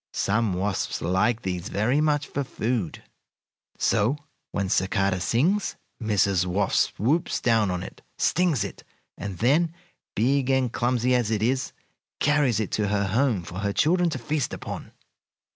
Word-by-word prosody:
Some 110 0 +1
wasps 95 +1 -1
like 95 +7 +1
these 90 -1 -3
very 120 +9 +1
much 150 -2 +1
for 140 - -3
food. 115 -7 -3 0.7
So, 120 +8 +2 0.3
when 100 -1 -1
cicada 95 0 +1
sings, 145 - +1 0.3
Mrs. 100 -4 +2
Wasp 95 +2 +1
swoops 145 - +1
down 115 -4 +2
on 90 0 -2
it, - - -10 0.2
stings 170 - +2
it, 100 - -7 0.3
and 100 -3 -6
then, 155 - +2 0.4
big 130 +4 +2
and 130 -3 +2
clumsy 125 +1 +1
as 120 -4 +2
it 110 -1 0
is, 130 +3 0 0.5
carries 140 -7 +2
it 110 - -2
to 105 -1 0
her 100 -1 0
home 115 -3 +1
for 90 +2 -7
her 100 0 -1
children 175 - +3
to 155 - -3
feast 145 +3 -2
upon." - - -7
115 Hz, 150 wpm, -25 LUFS, 100-135 Hz, 0.7 s, children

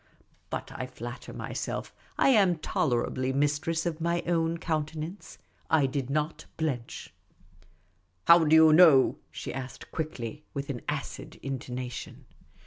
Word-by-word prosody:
But - - -5
I - - -5
Matter - - -7
myself - - -4 0.2
I - - +4
am 195 -9 +5
tolerably 130 -3 0
mistress 150 +4 0
of 165 -2 -2
my 170 +1 0
own 165 -1 +1
countenance. 160 +3 -4 0.3
I 155 -3 +4
did 135 -1 -2
not 150 +3 -2
blench. 135 -7 -3 0.6
" 90 0 -40
How 170 0 +8
do 155 0 +5
you 160 -1 +8
know?" 155 -6 +7
she - - -6
asked 130 0 -7
quickly, 150 -3 -5
with 140 0 -3
an 120 - -6
acid - - -5
intonation. 125 -2 -5
155 Hz, 135 wpm, -28 LUFS, 130-165 Hz, 0.6 s, How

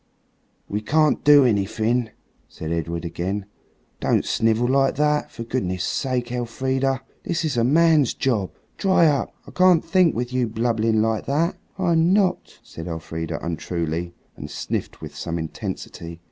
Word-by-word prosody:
"We 105 +1 -2
can't 155 +6 +2
do 145 -2 +7
anything," 110 +2 +1 0.4
said 80 0 -7
Edred 85 +1 -2
again; 95 +4 -3 0.5
"don't - - +1
snivel 115 +2 +2
like 135 +1 +2
that, 150 +1 +1
for 115 - -7
goodness' 95 -7 -2
sake, 125 -3 -1
Elfrida. 130 +2 -1 0.2
This 170 -1 -1
is 150 - -1
a 115 - +2
man's 155 +1 +4
job. 110 -8 0 0.3
Dry 190 -4 +4
up. 145 -3 +1
I - - -12
can't 180 -3 +4
think, 170 0 +3
with 120 +1 -3
you 125 -2 +1
blubbing 110 -1 +1
like 110 -1 -1
that." 160 +6 +1 0.2
"I'm 170 -1 +3
not," 195 -3 +1
said 80 +1 -9
Elfrida 80 0 -4
untruly, 85 0 -3 0.2
and - - -8
sniffed - - -4
with - - -8
some 85 0 -3
intensity. 85 +1 -6
120 Hz, 145 wpm, -23 LUFS, 95-150 Hz, 0.5 s, do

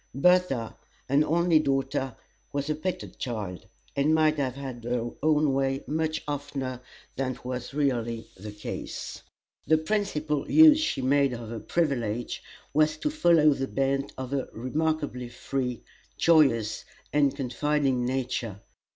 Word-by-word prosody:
Bertha, 140 -6 +3 0.3
an 140 +3 +4
only 165 +1 +3
daughter, 135 -3 -1 0.4
was 140 +1 -2
a - - 0
petted 180 +3 -5
child, 105 -8 -4 0.3
and 150 +3 +3
might 155 -1 +3
have 130 -3 -1
had 130 -4 -7
her 120 0 -2
own 150 -2 +3
way 135 0 0
much 155 +1 -1
oftener 140 -3 -4 0.4
than 130 -1 -1
was 125 0 -4
really 120 -5 0
the 105 +3 -8
case. 105 0 -6 0.5
The 160 - +5
principal 155 -5 -1
use 315 -1 +8
she 310 - -1
made 140 0 +3
of 115 -2 -6
her 115 -1 -5
privilege 120 -7 -1 0.3
was 155 +1 +3
to 300 - -1
follow 170 - +5
the 135 -1 -3
bent 135 +1 0
of 130 +1 -5
a 135 -2 -1
remarkably 140 0 -2
free, 125 0 -3 0.3
joyous, 135 -10 +3 0.3
and 145 -2 +3
confiding 135 0 0
nature. 125 -5 -2
135 Hz, 135 wpm, -27 LUFS, 125-155 Hz, 0.5 s, use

